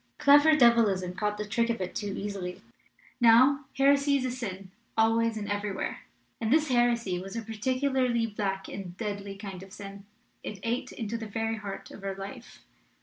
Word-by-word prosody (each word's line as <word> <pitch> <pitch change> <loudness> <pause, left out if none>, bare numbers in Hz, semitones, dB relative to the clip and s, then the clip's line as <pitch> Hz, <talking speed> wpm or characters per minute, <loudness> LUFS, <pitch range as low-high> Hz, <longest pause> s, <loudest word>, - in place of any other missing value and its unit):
Clever 290 +1 +6
devilism 220 -9 +4
caught 210 +2 -1
the 210 - -3
trick 230 +3 0
of 230 - -1
it 185 -1 -4
too 205 -1 -3
easily. 195 -3 -5 0.6
Now, 255 +4 +6
heresy 280 +1 +4
is 255 -2 -2
sin 195 -4 -6 0.3
always 225 0 +3
and 205 -1 -4
every 205 0 -2
where; 190 - -4 0.4
and 225 -1 -1
this 310 0 +3
heresy 235 -6 +2
was 195 +3 -8
a 230 - -3
particularly 255 +2 0
black 200 -3 -3
and 185 -2 -7
deadly 200 -2 -4
kind 195 -2 -8
of 195 0 -12
sin. 200 0 -10 0.3
It 210 - -6
ate 235 +2 -2
into 230 0 -4
the 225 - -6
very 225 +2 -2
heart 200 -2 -7
of 200 - -11
our 195 -1 -3
life. 215 +6 -9
220 Hz, 175 wpm, -28 LUFS, 195-240 Hz, 0.6 s, Clever